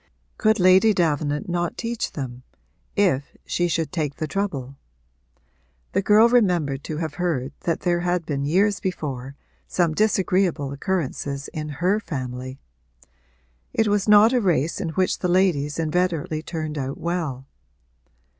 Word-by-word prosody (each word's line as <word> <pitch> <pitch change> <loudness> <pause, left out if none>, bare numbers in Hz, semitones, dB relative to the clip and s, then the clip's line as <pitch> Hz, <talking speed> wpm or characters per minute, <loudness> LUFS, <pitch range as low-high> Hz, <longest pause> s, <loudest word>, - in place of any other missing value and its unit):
Could 220 -1 +3
Lady 185 +4 +5
Davenant 150 -4 0
not 175 -1 -2
teach 230 -1 -3
them, 125 -3 -6 0.5
if 170 -9 +1
she 175 - 0
should 165 -1 -1
take 155 -6 -2
the 155 - -3
trouble? 150 -8 -3 1.2
The - - +1
girl 210 +3 +6
remembered 175 - +2
to 155 - -4
have 160 -2 -3
heard 145 -7 -1
that 170 - 0
there 175 -1 +1
had 175 -1 -1
been 140 -3 -2
years 195 +7 +2
before 140 -7 -4 0.3
some 170 -3 +1
disagreeable 185 -7 +1
occurrences 140 -3 -3
in 155 -1 -5
her 195 +4 +3
family; 130 - -5 1.2
it 225 -1 +2
was 205 0 +1
not 210 +3 +7
a 250 - +3
race 170 - +1
in - - -2
which 185 +3 0
the 180 - 0
ladies 175 -6 +2
inveterately 165 -1 0
turned 155 -2 -4
out 135 0 -4
well. 160 -7 -3
170 Hz, 140 wpm, -23 LUFS, 145-190 Hz, 1.2 s, not